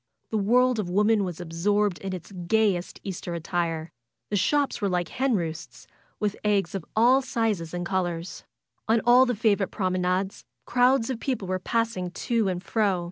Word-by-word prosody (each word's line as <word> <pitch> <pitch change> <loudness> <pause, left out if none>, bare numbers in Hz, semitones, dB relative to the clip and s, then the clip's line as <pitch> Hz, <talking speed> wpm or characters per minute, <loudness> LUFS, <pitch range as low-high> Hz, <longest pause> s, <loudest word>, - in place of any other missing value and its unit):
The 220 - +1
world 245 +3 +3
of 190 -4 -2
woman 210 +3 +3
was 180 -3 -5
abroad 180 +3 0
in 195 - -5
its 185 +1 -7
gayest 185 0 0
Easter 175 -2 -5
attire. 165 -1 -2 0.4
The - - +1
shops 285 +6 +1
were 200 - +1
like 175 -2 -1
hen 260 -2 0
roosts, 165 -3 -5 0.3
with 210 -1 0
eggs 200 -4 +1
of 195 -4 -3
all 245 +5 +5
sizes 220 -10 -1
and 175 0 -4
colors. 175 -2 -3 0.4
On 225 +1 +4
all 250 +2 +6
the 245 - 0
favorite 205 -2 +2
prom 185 -3 -1
enades, 185 +1 -1 0.2
crowds 250 0 +3
of 240 - -4
people 235 -8 -2
were 185 0 -1
passing 225 -3 -1
to 225 +4 -1
and 180 -1 -2
fro. 205 -5 +1
195 Hz, 175 wpm, -26 LUFS, 180-225 Hz, 0.4 s, all